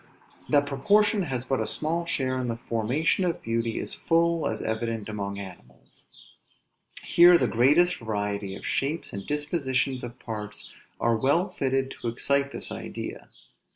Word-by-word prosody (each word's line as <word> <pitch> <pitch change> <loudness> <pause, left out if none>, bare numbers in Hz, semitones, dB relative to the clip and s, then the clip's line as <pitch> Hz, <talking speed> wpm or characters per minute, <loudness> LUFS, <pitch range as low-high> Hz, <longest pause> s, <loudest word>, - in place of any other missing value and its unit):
That 145 -1 +4
proportion 205 +10 +3
has 130 -8 -3
but 135 0 0
a - - -1
small 170 +2 0
share 130 -5 0
in 125 - -2
the 115 -1 -2
formation 125 - 0
of 175 -2 -1
beauty 115 0 -1
is - - -3
full 165 -1 +1
as 110 - -2
evident 110 -1 -2
among 100 -2 -4
animals. 90 -11 -12 1.0
Here 175 0 +7
the - - +1
greatest 150 +10 +4
variety 105 -3 -3
of - - -10
shapes 150 +5 -2
and 100 -1 -6
dispositions 140 -3 -1
of 120 +1 -7
parts 105 -3 -7 0.3
are 115 0 +2
well 145 - +2
fitted 135 -5 -1
to - - -3
excite 140 +4 0
this - - -4
idea. - - -6
130 Hz, 155 wpm, -26 LUFS, 110-155 Hz, 1.0 s, Here